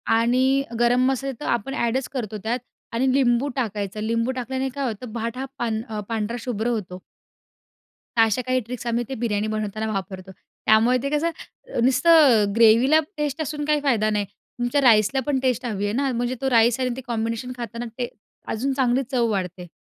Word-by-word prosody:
आणि 255 +4 +3 0.2
गरम 245 +1 +3
मसाले 270 +1 -1
तर - - -6
आपण 240 +4 -1
ॲडच 250 0 0
करतो 220 -5 -4
त्यात 235 +3 -1 0.3
आणि 255 +3 +2
लिंबू 255 -1 +3
टाकायचं, 210 -5 -3
लिंबू 230 +3 0
टाकल्याने 260 +1 -3
काय 280 -1 -2
होतं 225 +1 -6
भात 230 +1 -3
हा 265 - -3
पां 220 -2 -3
पांढरा 225 0 -2
शुभ्र 230 -2 -2
होतो. 195 -6 -3 1.2
तर - - +7
अशा 225 +2 +1
काही 255 0 +1
ट्रिक्स 245 0 -6
आम्ही 235 +1 0
ते 265 - -3
बिर्याणी 210 -2 0
बनवताना 215 0 -3
वापरतो, 190 -1 -5
त्यामुळे 220 +5 +1
ते 280 - -1
कसं 300 -4 -3
नुसतं 255 -5 +5
ग्रेव्हीला 230 +7 +6 0.2
टेस्ट 295 0 -2
असून 295 0 -3
काही 300 0 +2
फायदा 235 -7 +2
नाही, 210 -1 0 0.3
तुमच्या 245 +4 +1
राईसला 225 0 +4
पण 275 -2 +1
टेस्ट 255 -1 0
हवी 205 -4 -2
आहे 205 - -1
ना, 270 +1 0
म्हणजे 245 +1 -1
तो 270 - +1
राईस 235 +1 +4
आणि 255 - 0
ते - - -5
कॉम्बिनेशन 230 +1 -2
खाताना 235 0 -5
ते 245 -1 -2 0.4
अजून 270 +5 -1
चांगली 260 -1 +1
चव 240 -3 +2
वाढते. 180 -2 -3
240 Hz, 180 wpm, -23 LUFS, 220-265 Hz, 1.2 s, तर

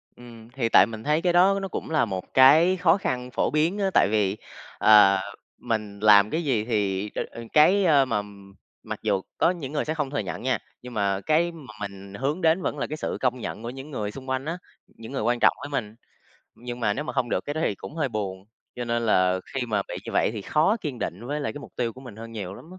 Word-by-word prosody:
Ừm, 115 -2 -13
thì 125 -4 -1
tại - - +7
mình 110 +1 -8
thấy 150 +2 +1
cái 175 0 +1
đó 190 +3 +5
nó 195 - -3
cũng - - -6
là 155 -6 +2
một 95 -4 -6
cái 155 +8 +6
khó 180 -1 +4
khăn 125 -9 -3
phổ - - 0
biến 160 +6 +1
á, 195 -1 +1
tại - - +5
vì, 105 -2 +1 0.4
ờ, 105 -3 +6 0.4
mình 110 -4 -3
làm 105 -1 +6
cái 165 +6 -2
gì 125 -8 +1
thì 105 -3 -1
đ - - -2 0.3
cái, 185 +6 +5
a, 145 -5 +5
mà 115 -5 -1 0.6
mặc - - -6
dù 95 -1 0 0.2
có 170 - +3
những 155 -7 -6
người 150 - -1
sẽ 155 - -1
không 150 -4 -2
thừa 145 - -2
nhận 95 -4 -5
nha, 130 -1 +1 0.2
nhưng 125 0 -10
mà 100 -2 0
cái 165 +3 +2
mà 145 -9 -12
mình 100 -1 -7
hướng 140 - -2
đến 165 +2 +3
vẫn 150 - -2
là - - -2
cái 155 - -5
sự - - -3
công 125 -1 0
nhận 110 -1 -6
của 115 - -4
những 135 +4 -9
người 105 -6 -3
xung 130 +2 -10
quanh 130 +1 -1
á, 165 +3 -3 0.3
những 115 +1 -12
người 140 - -3
quan 120 +2 +1
trọng - - +5
với 145 - -6
mình, 110 -7 -3 0.6
nhưng 120 0 -8
mà 105 -3 +1
nếu 145 +7 -4
mà - - -5
không 130 -3 -1
được - - -1
cái 145 - -4
đó 155 - -2
thì - - 0
cũng 125 - -10
hơi 155 -4 -1
buồn. 95 -4 -4 0.3
Cho 125 - -3
nên 120 0 -1
là 95 -3 +3
khi 130 -2 -1
mà 105 -3 0
bị - - -5
như - - -7
vậy - - +2
thì 105 -3 -6
khó 160 - +2
kiên 145 -8 -5
định 105 +4 -5
với 145 +3 -2
lại 140 - -2
cái 145 - -8
mục - - -12
tiêu 120 -2 -1
của 130 - -13
mình 125 -6 -11
hơn 115 +1 -9
nhiều 100 -4 -6
lắm - - -12
á. 185 - -12
125 Hz, 260 wpm, -25 LUFS, 105-150 Hz, 0.6 s, tại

